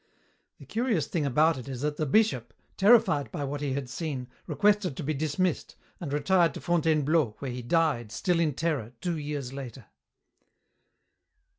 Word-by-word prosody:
"The - - -13
curious 225 - 0
thing 155 -5 -1
about 155 +3 +3
it 125 - -9
is 130 -2 -5
that 150 0 -1
the 155 - -1
bishop, 130 - +2 0.2
terrified 205 - +4
by 150 -5 -4
what 140 +1 -4
he 140 -2 -1
had 135 -1 -3
seen, 130 -2 -4 0.2
requested 205 -7 +2
to - - -4
be 155 +2 -1
dismissed, 155 +4 -1 0.2
and 160 -6 -5
retired 170 +4 +2
to - - -5
Fontainebleau, 155 -6 +1
where 135 -3 -5
he 125 +1 -5
died, 120 -5 +1
still 170 +10 0
in 155 -5 +1
terror, 145 -9 -2
two 170 -3 -2
years 145 -3 -4
later." 135 -4 -8
150 Hz, 165 wpm, -28 LUFS, 135-170 Hz, 0.2 s, terrified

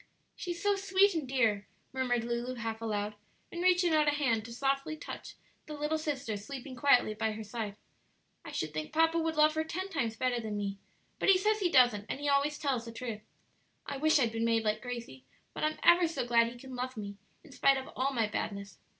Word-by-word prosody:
"She's 345 -2 -5
so 410 0 +3
sweet 395 0 +3
and 315 -5 -2
dear!" 225 -6 +1 0.3
murmured 250 -3 0
Lulu 240 +2 -3
half 225 -1 -4
aloud, 210 -2 -2 0.4
and 345 - -5
reaching 360 -2 +4
out 305 -1 +4
a - - +5
hand 245 -7 +1
to 235 - -9
softly 275 +5 -1
touch - - -8 0.3
the 305 - -6
little 300 +2 -1
sister 285 -7 -3
sleeping 260 +5 -8
quietly 245 -4 +4
by 220 +1 -1
her 220 +1 -6
side; 210 -1 -5 0.7
"I - - -8
should 155 -1 -3
think 155 0 -4
papa 325 +1 +3
would 325 -1 -1
love 305 0 +5
her 315 0 0
ten 370 +4 -4
times 235 - -1
better 245 0 0
than 215 -2 -4
me; 200 -1 -3 0.4
but - - +2
he 385 - +7
says 430 +3 +1
he 370 -3 +2
doesn't, 245 -8 +4
and - - -3
he 290 - -3
always 285 +1 +2
tells 265 -6 -1
the 230 - -7
truth. 230 -2 -5 0.6
I 280 - -4
wish 310 +3 +4
I'd 240 -5 +2
been 225 0 -2
made 230 -1 +2
like 215 0 0
Gracie; 235 - -7 0.3
but - - -5
I'm 310 0 0
ever 345 0 +6
so 325 -6 -3
glad 235 -1 +4
he 240 +1 -8
can 260 +1 -10
love 255 0 -4
me 200 -1 -6 0.3
in 315 - -16
spite 270 +1 +3
of 265 - -5
all 265 +2 0
my 235 -4 +1
badness. 200 -2 -5
255 Hz, 220 wpm, -31 LUFS, 225-310 Hz, 0.7 s, he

